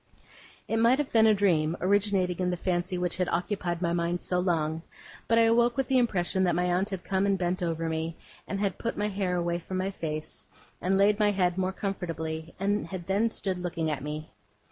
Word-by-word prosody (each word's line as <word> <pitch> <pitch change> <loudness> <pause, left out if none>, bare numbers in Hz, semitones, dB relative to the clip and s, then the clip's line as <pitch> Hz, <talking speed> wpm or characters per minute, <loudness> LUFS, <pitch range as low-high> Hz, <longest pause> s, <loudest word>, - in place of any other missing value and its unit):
It 225 - 0
might 230 +3 +5
have 295 -2 -2
been 220 -1 +6
a 215 - +6
dream, 170 -5 +2
originating 190 -2 +1
in 180 -1 +1
the 180 - -1
fancy 180 +1 -1
which 180 0 -1
had 180 -1 0
occupied 175 0 -1
my 170 0 +1
mind 170 +1 -1
so 180 - 0
long, 160 -3 0 0.5
but 230 - +3
I 230 - +6
awoke 235 +2 +3
with 270 -1 0
the 260 -1 +4
impression 190 -5 +1
that 175 -2 +2
my 175 - +1
aunt 180 +3 +1
had 190 -3 -5
come 195 0 +1
and 195 -1 +2
bent 180 0 -1
over 165 -1 -1
me, 160 0 -3 0.3
and 195 - -3
had 200 -1 -1
put 230 - -3
my 210 0 0
hair 190 -3 -1
away 170 0 0
from 185 +2 -5
my 190 +1 -1
face, 155 -4 -4 0.3
and 190 +1 +2
laid 205 +1 +4
my 210 -1 +4
head 180 -3 +1
more 185 0 0
comfortably, 165 -5 -4
and 205 +2 0
had 185 -3 -6
then 200 +5 +2
stood 190 -4 -2
looking 170 -3 -2
at 145 - -3
me. 150 +2 -6
185 Hz, 220 wpm, -28 LUFS, 170-200 Hz, 0.5 s, been